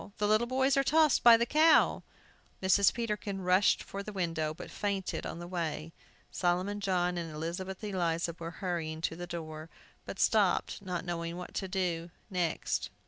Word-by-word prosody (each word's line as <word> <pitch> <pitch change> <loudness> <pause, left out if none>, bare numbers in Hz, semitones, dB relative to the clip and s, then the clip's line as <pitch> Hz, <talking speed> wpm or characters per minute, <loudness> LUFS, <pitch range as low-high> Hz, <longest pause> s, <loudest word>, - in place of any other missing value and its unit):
The 210 -1 +1
little 215 +3 +3
boys 265 +2 +2
are 275 - +4
tossed 310 0 +4
by 235 -1 +9
the 235 - +1
cow!" 310 +5 +4 0.6
Mrs. 190 +1 +4
Peterkin 210 -4 -3
rushed 185 +2 +3
for 200 - -6
the 210 - -7
window, 165 -5 -1
but 155 - -9
fainted 200 -2 -2
on - - -6
the 175 - -7
way. 165 -2 -4 0.4
Solomon 185 +3 0
John 180 -3 0
and 165 -2 -5
Elizabeth 180 +6 -5
Eliza 170 -4 -1
were 165 0 -5 0.2
hurrying 160 -3 -2
to 165 - -1
the 175 +1 -7
door, 155 -2 -7 0.3
but - - -7
stopped, - - +2
not 180 -3 -4
knowing 170 -1 -3
what 180 - -8
to 190 - -3
do 180 -3 -2 0.2
next. 175 -3 -1
180 Hz, 170 wpm, -31 LUFS, 170-205 Hz, 0.6 s, by